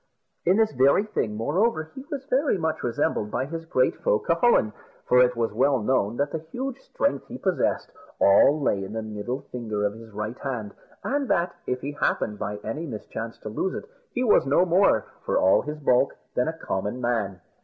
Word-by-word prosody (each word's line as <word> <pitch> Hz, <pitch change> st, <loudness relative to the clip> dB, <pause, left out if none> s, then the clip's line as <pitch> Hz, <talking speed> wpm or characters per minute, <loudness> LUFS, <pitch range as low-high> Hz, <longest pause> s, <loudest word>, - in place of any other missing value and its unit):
In 185 Hz, +3 st, +5 dB
this 220 Hz, -1 st, +3 dB
very 140 Hz, +8 st, +4 dB
thing, 115 Hz, -, -2 dB
moreover, 160 Hz, -, 0 dB
he 265 Hz, -, -8 dB
was 275 Hz, -2 st, -5 dB
very 275 Hz, -4 st, +2 dB
much 160 Hz, -2 st, -1 dB
resembled 115 Hz, -3 st, 0 dB
by 130 Hz, -, -1 dB
his 165 Hz, +3 st, -6 dB
great 130 Hz, -5 st, +2 dB
foe, 105 Hz, -, +2 dB
Cucullin; 165 Hz, -, +2 dB, 0.3 s
for 125 Hz, -, +5 dB
it 125 Hz, 0 st, +3 dB
was 115 Hz, -1 st, -1 dB
well 140 Hz, -2 st, +3 dB
known 115 Hz, -1 st, 0 dB
that 145 Hz, +1 st, 0 dB
the 160 Hz, -, -2 dB
huge 265 Hz, +1 st, -4 dB
strength 280 Hz, +1 st, -2 dB
he 250 Hz, -, -7 dB
possessed 190 Hz, -6 st, 0 dB, 0.3 s
all 140 Hz, +10 st, +6 dB
lay 100 Hz, -8 st, 0 dB
in 95 Hz, +2 st, -7 dB
the 110 Hz, 0 st, -3 dB
middle 110 Hz, +5 st, -4 dB
finger 110 Hz, -4 st, -2 dB
of 100 Hz, -, 0 dB
his 115 Hz, +1 st, -12 dB
right 105 Hz, +4 st, -5 dB
hand, 120 Hz, -7 st, -4 dB, 0.3 s
and 280 Hz, 0 st, -1 dB
that, 170 Hz, +1 st, +1 dB
if 125 Hz, 0 st, -1 dB
he 140 Hz, -, -3 dB
happened 105 Hz, -7 st, -1 dB
by 105 Hz, 0 st, -3 dB
any 150 Hz, +10 st, -4 dB
mischance 115 Hz, -1 st, -6 dB
to 110 Hz, -, -6 dB
lose 185 Hz, -, -2 dB
it, -, -, -6 dB, 0.2 s
he 250 Hz, -, -1 dB
was 210 Hz, -, +4 dB
no 145 Hz, +6 st, +4 dB
more, 175 Hz, -, +3 dB, 0.2 s
for -, -, 0 dB
all 95 Hz, -, +5 dB
his 150 Hz, +1 st, -5 dB
bulk, 135 Hz, -2 st, +2 dB, 0.2 s
than 125 Hz, -, +1 dB
a 160 Hz, 0 st, -3 dB
common 105 Hz, +1 st, -3 dB
man. 110 Hz, -6 st, -1 dB
130 Hz, 200 wpm, -25 LUFS, 110-170 Hz, 0.3 s, all